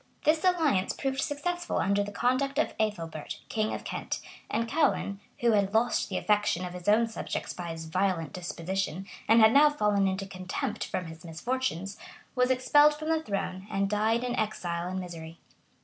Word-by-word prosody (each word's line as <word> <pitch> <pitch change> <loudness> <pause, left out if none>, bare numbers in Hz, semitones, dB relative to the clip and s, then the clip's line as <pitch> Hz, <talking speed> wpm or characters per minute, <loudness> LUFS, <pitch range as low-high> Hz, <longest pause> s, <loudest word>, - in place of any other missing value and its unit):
This 315 +1 +3
alliance 320 - +2
proved 270 0 -2
successful 350 +4 -2
under 200 +1 +2
the 205 - -6
conduct 255 +5 +1
of 310 - +1
Ethelbert, 165 -8 -3
king 215 -1 0
of - - -4
Kent; - - -3 0.3
and 230 +1 0
Ceaulin, 270 -8 +1 0.2
who 235 -1 +4
had 200 -1 +2
lost 230 +2 +2
the - - -2
affections 210 -4 +1
of 180 - -6
his 180 0 -9
own 215 +3 +5
subjects 225 - -4
by 175 -1 -6
his 165 0 -6
violent 175 -1 0
disposition, 185 +1 -3 0.2
and 225 +1 +6
had 220 +1 +7
now 295 +2 +7
fallen 210 -8 +2
into 190 +1 -2
contempt 185 -2 -4
from 180 - -3
his 160 0 -10
misfortunes, 195 +2 -3 0.3
was 250 -1 +2
expelled 290 +4 +5
the 315 +1 0
throne,[]and 195 -3 -2
died 220 +3 +2
in 245 -1 -1
exile 175 -5 -2
and 185 0 -3
misery. 165 -2 -8
210 Hz, 170 wpm, -29 LUFS, 185-255 Hz, 0.3 s, had